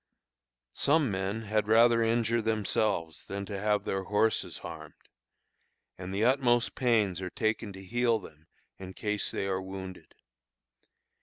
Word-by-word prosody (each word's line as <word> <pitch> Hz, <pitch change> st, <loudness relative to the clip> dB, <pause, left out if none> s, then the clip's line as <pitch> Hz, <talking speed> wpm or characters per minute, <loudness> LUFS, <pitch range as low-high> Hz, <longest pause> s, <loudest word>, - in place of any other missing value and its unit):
Some 145 Hz, -4 st, +2 dB
men 100 Hz, +3 st, -2 dB
had 105 Hz, 0 st, 0 dB
rather 115 Hz, +1 st, +5 dB
injure 115 Hz, 0 st, +2 dB
themselves 105 Hz, -7 st, -1 dB
than 100 Hz, 0 st, -4 dB
have 105 Hz, 0 st, 0 dB
their 95 Hz, -1 st, -2 dB
horses 105 Hz, +3 st, +1 dB
harmed, -, -, -9 dB, 1.0 s
and 95 Hz, 0 st, -7 dB
the 100 Hz, +3 st, +1 dB
utmost 120 Hz, -2 st, +3 dB
pains 105 Hz, -8 st, +1 dB
are 90 Hz, -, -4 dB
taken 110 Hz, +1 st, -1 dB
to 95 Hz, 0 st, -10 dB
heal 120 Hz, +3 st, +2 dB
them 80 Hz, -6 st, -13 dB, 0.3 s
in 95 Hz, -1 st, -9 dB
case 105 Hz, -2 st, -1 dB
they -, -, -2 dB
are 95 Hz, -1 st, -1 dB
wounded. 95 Hz, -3 st, -8 dB
105 Hz, 135 wpm, -29 LUFS, 95-115 Hz, 1.0 s, rather